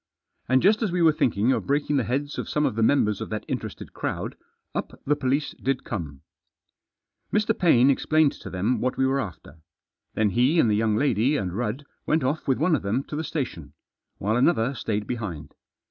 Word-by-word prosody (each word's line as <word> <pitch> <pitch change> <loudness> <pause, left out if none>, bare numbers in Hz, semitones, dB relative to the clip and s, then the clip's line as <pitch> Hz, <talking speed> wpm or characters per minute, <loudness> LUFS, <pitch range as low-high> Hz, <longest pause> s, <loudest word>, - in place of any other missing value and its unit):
And 130 +3 +4
just 210 +4 +4
as 215 -5 0
we 175 -1 +1
were 160 - +7
thinking 120 -5 +1
of - - -1
breaking 145 +1 +1
the 130 - +2
heads 140 +6 -2
of - - -4
some 150 0 +1
of 135 - 0
the 115 - -2
members 110 -4 +2
of - - -5
that 110 -1 -4
interested - - -5
crowd, - - -4 0.4
up - - -5
the 150 - +2
police 140 +1 0
did 135 0 -1
come. 75 - -5 1.1
Mr. 215 +1 +2
Paine 140 -7 +5
explained 155 +2 +3
to - - -10
them 100 +7 0
what 130 +1 -1
we 135 - +2
were 135 +1 +1
after. 85 - -7 0.6
Then 110 -2 +2
he 130 - +3
and 115 - +4
the - - +3
young 110 0 +1
lady 130 +3 +2
and 90 -6 -3
Rudd 120 +6 -3 0.2
went 155 -2 +2
off 145 +5 -1
with 135 - +2
one 160 +3 +3
of 130 - -2
them 110 +7 -1
to - - -4
the 155 - -2
station, 85 - -4 0.4
while 105 +3 0
another 125 -2 +2
stayed 105 -4 -2
behind. 105 -11 -5
130 Hz, 205 wpm, -25 LUFS, 110-150 Hz, 1.1 s, were